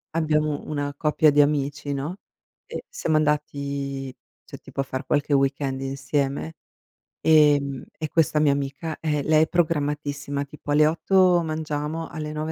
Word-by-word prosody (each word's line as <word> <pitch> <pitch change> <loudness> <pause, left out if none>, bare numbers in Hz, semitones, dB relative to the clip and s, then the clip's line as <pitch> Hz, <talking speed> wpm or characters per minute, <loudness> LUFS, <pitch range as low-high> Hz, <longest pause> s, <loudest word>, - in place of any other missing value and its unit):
abbiamo 155 -2 +1
una 145 -1 -2
coppia 155 +1 +3
di 145 0 +2
amici, 145 0 +1
no, 150 +7 -4 0.5
e - - -7
siamo 160 - 0
andati, 140 -2 -2 0.3
cioè, - - -11
tipo - - -10
a - - +3
far 130 -1 -5
qualche 145 0 +1
weekend 135 -1 +1
insieme, 140 +3 -2 0.7
ehm, 145 -4 +4
e 155 - -3
questa 155 -1 +2
mia 150 -2 +4
amica, 140 +3 -3
eh 150 -2 -1
lei 155 +1 +4
è - - 0
programmatissima, 145 -4 -1
tipo 145 +1 -8
alle 150 +1 +5
8 180 +2 +3
mangiamo, 155 0 -3
alle 155 -1 -5
9 155 +1 -3
150 Hz, 150 wpm, -24 LUFS, 140-155 Hz, 0.7 s, alle